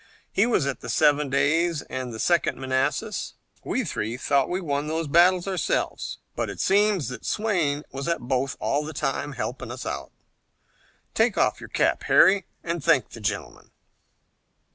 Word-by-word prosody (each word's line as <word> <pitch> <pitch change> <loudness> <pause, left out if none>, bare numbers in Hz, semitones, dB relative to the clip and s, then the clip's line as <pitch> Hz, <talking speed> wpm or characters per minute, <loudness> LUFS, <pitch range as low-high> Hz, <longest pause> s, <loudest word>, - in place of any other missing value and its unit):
He 200 +4 +3
was 230 - +2
at 140 -3 -2
the 120 - -8
Seven 150 +1 +3
Days 150 +4 +1
and 130 -1 -5
the 110 - -7
Second 170 +8 +1
Manassas. 135 +11 -1 0.3
We 260 - -1
three 115 - -3
thought 140 +1 +1
we 180 - -1
won 145 -4 -2
those 160 +1 -1
battles 175 +4 +4
ourselves, 190 -2 -1 0.2
but - - -2
it - - -7
seems 200 -4 +2
that 125 - -8
Swayne 170 -10 0
was 135 0 -5
at 170 - 0
both 130 +2 -1
all 145 +2 0
the 155 +1 -6
time, 145 0 -2
helping 125 - -5
us. - - -6 1.3
Take - - +2
off - - +2
your - - -9
cap, - - +1
Harry, 195 -2 +5 0.2
and 170 -3 -3
thank 155 -5 +3
the 115 - -10
gentleman." 105 - -4
150 Hz, 165 wpm, -25 LUFS, 135-175 Hz, 1.3 s, Harry